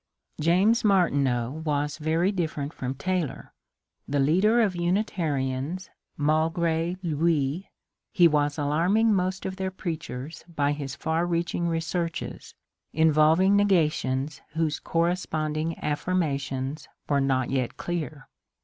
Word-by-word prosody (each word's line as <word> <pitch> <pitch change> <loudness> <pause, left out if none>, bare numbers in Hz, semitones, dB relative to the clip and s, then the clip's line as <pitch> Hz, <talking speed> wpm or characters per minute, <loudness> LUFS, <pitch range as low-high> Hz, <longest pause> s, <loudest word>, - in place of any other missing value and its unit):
James 190 +9 +3
Martineau 140 - +2
was 150 0 -1
very 165 +5 +1
different 155 -6 -3
from 130 +1 -4
Taylor. 175 0 -3 0.5
The 145 0 0
leader 190 +12 +4
of 205 -6 +2
Unitarians 170 -4 -1 0.3
malgre 165 +3 +1
luiy 160 0 0 0.4
he 175 -2 +6
was 145 -1 +1
alarming 175 +10 +2
most 185 0 -1
of 190 0 -4
their 190 -1 -1
preachers 160 -5 -6
by 145 -1 +2
his 140 -2 -4
far 160 +5 -1
reaching 170 0 -1
researches, 165 0 -3 0.4
involving 160 +5 +4
ne 205 0 +4
gations 150 -6 +1
whose 160 -2 0
corresponding 165 -2 -1
affirmations 145 -4 -2 0.2
were 140 -1 +2
not 130 -2 +1
yet 130 -3 -1
clear. 155 -5 -4
160 Hz, 115 wpm, -26 LUFS, 145-175 Hz, 0.5 s, he